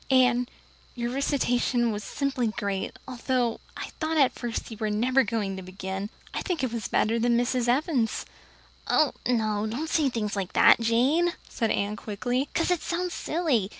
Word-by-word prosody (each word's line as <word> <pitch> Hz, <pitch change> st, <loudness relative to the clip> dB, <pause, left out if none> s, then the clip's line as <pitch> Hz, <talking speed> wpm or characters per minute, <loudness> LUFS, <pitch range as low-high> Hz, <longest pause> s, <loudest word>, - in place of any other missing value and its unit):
Anne, 250 Hz, -2 st, +4 dB, 0.5 s
your 240 Hz, -1 st, -2 dB
recitation 245 Hz, -3 st, +1 dB
was 210 Hz, 0 st, -4 dB
simply 275 Hz, -2 st, -1 dB
great, 200 Hz, +1 st, -3 dB
although 250 Hz, -2 st, -1 dB, 0.2 s
I -, -, -6 dB
thought 320 Hz, 0 st, 0 dB
at 275 Hz, -4 st, +5 dB
first 240 Hz, -1 st, -4 dB
you 220 Hz, -, -7 dB
were 215 Hz, -1 st, -1 dB
never 250 Hz, +6 st, +3 dB
going 205 Hz, -3 st, -2 dB
to -, -, -5 dB
begin. 190 Hz, +2 st, -5 dB, 0.2 s
I -, -, -2 dB
think 345 Hz, -7 st, -2 dB
it 245 Hz, -3 st, -1 dB
was 230 Hz, -2 st, -3 dB
better 230 Hz, +2 st, +1 dB
than 235 Hz, 0 st, +3 dB
Mrs. 245 Hz, 0 st, +1 dB
Evans's." 250 Hz, -2 st, +1 dB, 0.6 s
"Oh, 305 Hz, -4 st, +3 dB
no, 215 Hz, -3 st, +1 dB
don't 275 Hz, +9 st, -3 dB
say 300 Hz, -4 st, +3 dB
things 215 Hz, -4 st, -2 dB
like 195 Hz, -2 st, -3 dB
that, -, -, +7 dB
Jane," 265 Hz, +10 st, +3 dB
said 225 Hz, -2 st, -1 dB
Anne 205 Hz, +1 st, -1 dB
quickly, 245 Hz, +7 st, -2 dB
"because 330 Hz, +2 st, +1 dB
it 355 Hz, -, +1 dB
sounds 355 Hz, 0 st, -2 dB
silly. 295 Hz, -, 0 dB
240 Hz, 175 wpm, -27 LUFS, 215-270 Hz, 0.6 s, that